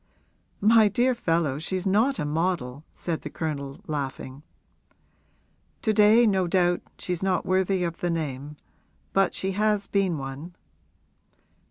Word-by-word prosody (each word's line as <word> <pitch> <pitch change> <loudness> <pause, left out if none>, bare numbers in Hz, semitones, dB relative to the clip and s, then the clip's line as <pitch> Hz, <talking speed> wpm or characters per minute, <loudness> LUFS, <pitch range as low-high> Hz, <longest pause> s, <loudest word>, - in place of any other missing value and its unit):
'My 220 +1 +6
dear 240 +6 +2
fellow, 165 - 0
she's 185 +4 -3
not 220 +8 +2
a 150 - -2
model,' 150 -4 -2
said 165 -3 -3
the 150 - -6
Colonel, 140 -4 -5
laughing. 135 -2 -5 1.4
'To 220 - +2
day, 215 +3 +6
no 190 -4 +2
doubt, 175 -1 +2 0.2
she's 180 -2 -3
not 190 -2 0
worthy 185 0 +1
of 170 -1 -3
the 175 - -1
name; 150 -3 -4 0.6
but 195 0 +2
she 190 - -1
has 210 +1 +1
been 195 -5 0
one.' 140 +6 -7
175 Hz, 135 wpm, -26 LUFS, 150-200 Hz, 1.4 s, My